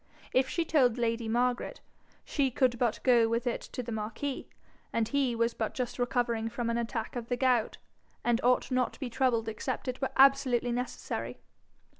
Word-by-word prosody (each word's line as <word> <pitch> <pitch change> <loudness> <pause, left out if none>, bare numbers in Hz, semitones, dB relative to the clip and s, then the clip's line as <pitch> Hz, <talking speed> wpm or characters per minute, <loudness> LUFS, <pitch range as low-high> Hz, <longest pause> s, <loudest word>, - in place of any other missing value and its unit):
If 260 +1 +3
she 335 - -1
told 255 -7 +3
lady 230 -1 -1
Margaret 245 +2 0 0.5
she 280 -3 +1
could 245 -1 +1
but 240 -3 +1
go 235 -3 +5
with 230 +2 0
it 240 - -1
to 250 - -6
the 235 - -6
marquis, 225 +6 -4 0.4
and 230 -1 0
he 270 -3 +1
was 230 0 +1
but 220 - -3
just 250 -1 -3
recovering 240 -2 0
from 235 0 -2
an 230 - 0
attack 230 0 -3
of 235 -1 -4
the 245 - -1
gout, 250 -3 +2 0.5
and 240 -1 +2
ought 250 +2 +2
not 255 -1 +1
to - - -15
be 260 -4 -4
troubled 235 -3 +1
except 225 +5 -4
it 255 +1 -3
were 265 - 0
absolutely 265 -3 +4
necessary. 245 +1 -4
245 Hz, 185 wpm, -30 LUFS, 230-255 Hz, 0.5 s, go